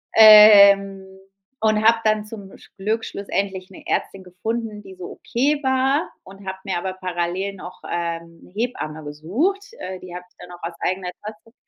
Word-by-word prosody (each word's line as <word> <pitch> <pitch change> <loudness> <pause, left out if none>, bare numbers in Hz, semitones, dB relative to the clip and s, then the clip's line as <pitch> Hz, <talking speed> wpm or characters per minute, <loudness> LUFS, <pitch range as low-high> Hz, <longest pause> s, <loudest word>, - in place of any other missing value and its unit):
Ähm, 200 -3 +8 0.6
und 215 -1 +2
habe 230 0 +5
dann 215 -1 +1
zum 205 -3 -11
sch - - -20
Glück 215 +3 -2
schlussendlich 195 -1 -4
'ne - - -13
Ärztin 195 -1 -2
gefunden, 215 +4 -5
die 190 -1 -12
so 180 -1 -9
okay 280 +4 -1
war. 265 +3 +1
Und 195 +1 -14
habe 190 0 -5
mir 190 - -2
aber 185 +2 -4
parallel 185 +1 -3
noch, 180 -1 -11
ähm, 170 -1 -4
'ne - - -18
Hebamme 200 -9 -4
gesucht. 225 - -2
Äh, 185 0 -6
die 180 -1 -10
habe 180 - -8
ich - - -37
dann 180 - -12
auch 175 - -12
aus 170 0 -5
eigener 185 0 -2
Tasche 215 +2 -11
195 Hz, 175 wpm, -21 LUFS, 180-220 Hz, 0.6 s, Ähm